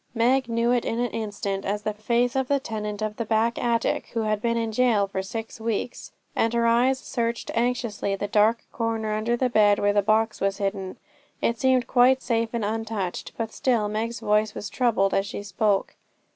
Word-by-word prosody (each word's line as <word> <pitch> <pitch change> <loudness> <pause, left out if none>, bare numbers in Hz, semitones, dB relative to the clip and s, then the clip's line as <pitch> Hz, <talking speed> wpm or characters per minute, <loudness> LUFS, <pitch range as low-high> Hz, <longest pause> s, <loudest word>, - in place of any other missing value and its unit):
Meg 245 +2 +2
knew 230 +1 +1
it 245 -1 +2
in 225 - -2
an 245 0 -1
instant 200 -3 -3
as 205 +1 -2
the 215 - -1
face 235 +4 0
of 265 -1 +1
the 280 0 +2
tenant 210 -4 -4
of 215 0 -3
the 230 - -1
back 225 +1 0
attic, 235 -1 0
who 230 - +1
had 215 -1 0
been 235 0 0
in 225 -1 -1
jail 220 -3 +3
for 195 -1 -3
six 225 +3 -6
weeks, 230 +2 -3 0.2
and 230 +1 +1
her 235 0 +2
eye 235 +3 +4
searched 235 -3 -3
anxiously 230 -4 -1
the 205 +1 -3
dark 215 +3 +2
corner 225 -2 -2
under 225 +3 0
the 255 - +2
bed, 210 -3 +4
where 205 0 +2
the 205 - +3
box 215 +2 +1
was 195 0 0
hidden. 195 -2 -3 0.4
It 235 0 0
seemed 260 -2 +3
quite 255 +2 +4
safe 230 -2 0
and 230 -3 -2
untouched, 215 -4 -3
but 225 -1 -3
still 240 -6 +1
Meg's 225 +2 -3
voice 210 -1 +1
was 205 - -6
troubled 225 -6 +2
as 195 +1 +1
she 200 - -6
spoke. 200 0 0
225 Hz, 200 wpm, -25 LUFS, 210-235 Hz, 0.4 s, eye